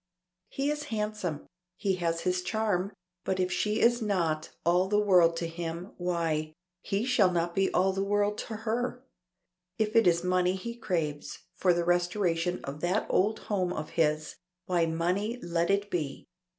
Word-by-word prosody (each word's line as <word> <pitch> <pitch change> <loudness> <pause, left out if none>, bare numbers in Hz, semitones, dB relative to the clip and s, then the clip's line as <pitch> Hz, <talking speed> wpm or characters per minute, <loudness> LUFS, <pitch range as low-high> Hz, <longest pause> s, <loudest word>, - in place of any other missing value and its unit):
He 280 +2 -1
is 295 0 -3
handsome, 210 -8 -3 0.3
he 195 -2 0
has 165 -1 -1
his 180 0 0
charm, 200 -1 0 0.3
but 190 0 -1
if 185 0 +1
she 210 +4 0
is 240 +1 +4
not 170 -7 0 0.2
all 180 +2 +3
the 205 +1 +2
world 180 -5 +5
to 170 - -2
him, 170 +2 -5
why, 165 -3 -1 0.3
he 200 +4 -1
shall 245 -7 +4
not 170 0 0
be 195 +1 +1
all 190 +1 +2
the 195 +1 -1
world 205 +1 +1
to 225 - -5
her. 245 +3 -2 0.7
If 215 0 0
it 225 -4 +6
is 170 0 +3
money 180 0 +2
he 235 +5 -5
craves, 165 -10 -3
for 180 0 +2
the 175 0 +1
restoration 175 0 +1
of 140 +2 -6
that 180 +5 +1
old 215 +4 +2
home 185 -4 -1
of 155 -2 -5
his, 155 -2 0 0.3
why 175 -2 +2
money 180 +8 -1
let 170 -2 -1
it 200 +1 +1
be. 150 -6 -3
180 Hz, 170 wpm, -29 LUFS, 170-210 Hz, 0.7 s, it